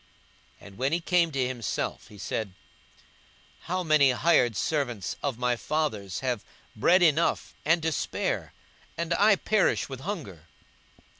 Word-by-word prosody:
42:015:017 -, -, -12 dB
And 100 Hz, -, -14 dB
when 135 Hz, +2 st, +1 dB
he 170 Hz, -, +2 dB
came 175 Hz, -1 st, +2 dB
to 135 Hz, -3 st, 0 dB
himself, 120 Hz, -7 st, -3 dB
he 105 Hz, -, -14 dB
said, 100 Hz, 0 st, -4 dB, 1.2 s
How 185 Hz, +1 st, 0 dB
many 155 Hz, -4 st, +5 dB
hired 125 Hz, -3 st, +3 dB
servants 120 Hz, -, -1 dB
of 140 Hz, -5 st, -2 dB
my 125 Hz, 0 st, +1 dB
father's 110 Hz, -, -2 dB
have 125 Hz, -5 st, -2 dB, 0.3 s
bread 180 Hz, -, +4 dB
enough 165 Hz, 0 st, +2 dB
and 160 Hz, +2 st, +2 dB
to 160 Hz, -, +1 dB
spare, -, -, -2 dB, 0.5 s
and 170 Hz, +1 st, -1 dB
I 205 Hz, +3 st, +5 dB
perish 210 Hz, -4 st, +1 dB
with 135 Hz, -2 st, -6 dB
hunger! 135 Hz, -, -6 dB
140 Hz, 145 wpm, -27 LUFS, 120-170 Hz, 1.2 s, many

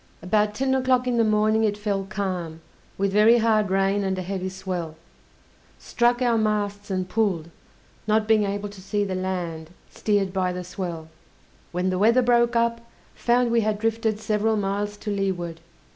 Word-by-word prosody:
About 210 Hz, +3 st, +1 dB
ten 265 Hz, +3 st, 0 dB
o'clock 255 Hz, -1 st, +2 dB
in 245 Hz, -1 st, 0 dB
the 230 Hz, -, +4 dB
morning 215 Hz, 0 st, +2 dB
it 205 Hz, -1 st, +1 dB
fell 200 Hz, -2 st, -2 dB
calm, 185 Hz, -5 st, -4 dB, 0.4 s
with 195 Hz, 0 st, 0 dB
very 215 Hz, +3 st, +6 dB
hard 220 Hz, -3 st, +2 dB
rain 195 Hz, +1 st, +1 dB
and 190 Hz, -1 st, -1 dB
a 185 Hz, -, -3 dB
heavy 190 Hz, 0 st, -3 dB
swell; 185 Hz, -4 st, -5 dB, 0.8 s
struck 240 Hz, +1 st, +1 dB
our 235 Hz, -2 st, +2 dB
masts 205 Hz, -1 st, -1 dB
and 185 Hz, -1 st, -2 dB
pulled, 185 Hz, -6 st, -1 dB, 0.6 s
not 215 Hz, 0 st, +2 dB
being 220 Hz, -1 st, +4 dB
able 200 Hz, +1 st, -2 dB
to 200 Hz, -2 st, -12 dB
see 205 Hz, +2 st, -1 dB
the 195 Hz, -2 st, -3 dB
land, 175 Hz, -4 st, -3 dB, 0.2 s
steered 200 Hz, -3 st, 0 dB
by 185 Hz, -1 st, 0 dB
the 180 Hz, 0 st, -5 dB
swell. 175 Hz, -3 st, -6 dB, 0.6 s
When 180 Hz, +1 st, -1 dB
the 185 Hz, -, -1 dB
weather 230 Hz, +5 st, +4 dB
broke 240 Hz, 0 st, +3 dB
up, 230 Hz, 0 st, +1 dB, 0.3 s
found 240 Hz, 0 st, +1 dB
we 230 Hz, -1 st, +3 dB
had 215 Hz, -1 st, 0 dB
drifted 225 Hz, 0 st, -1 dB
several 215 Hz, 0 st, 0 dB
miles 205 Hz, +1 st, -2 dB
to 210 Hz, -, -5 dB
leeward. 180 Hz, -4 st, -2 dB
205 Hz, 175 wpm, -24 LUFS, 185-220 Hz, 0.8 s, very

